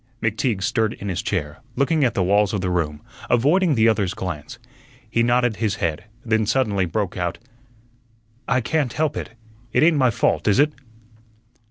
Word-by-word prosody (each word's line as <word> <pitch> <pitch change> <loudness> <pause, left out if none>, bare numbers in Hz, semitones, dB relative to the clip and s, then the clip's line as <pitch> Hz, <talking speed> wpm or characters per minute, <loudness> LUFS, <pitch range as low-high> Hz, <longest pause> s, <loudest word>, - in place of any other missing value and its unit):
McTeague 110 -2 -1
stirred 110 -2 +1
in 100 - -6
his 95 0 -2
chair, 75 -7 -3 0.2
looking 145 +3 +2
at 120 -4 +1
the 95 - +2
walls 100 +2 +2
of 100 - -1
the 90 -1 -1
room, 75 -4 -2 0.3
avoiding 150 +7 +3
the 110 -1 +4
other's 100 -4 +1
glance. 90 +4 -6 0.5
He 115 +2 0
nodded 120 -2 +2
his 110 -3 0
head, 85 -2 -2 0.2
then 110 -2 +1
suddenly 105 -7 +1
broke 95 +2 -2
out: 90 -1 -2 1.1
"I 130 - +2
can't 140 0 -1
help 155 -1 0
it. - - -6 0.4
It - - +3
ain't 160 -1 +4
my 130 -3 +4
fault, 110 - 0
is 100 - +4
it?" 150 +2 +3
110 Hz, 175 wpm, -22 LUFS, 95-125 Hz, 1.1 s, the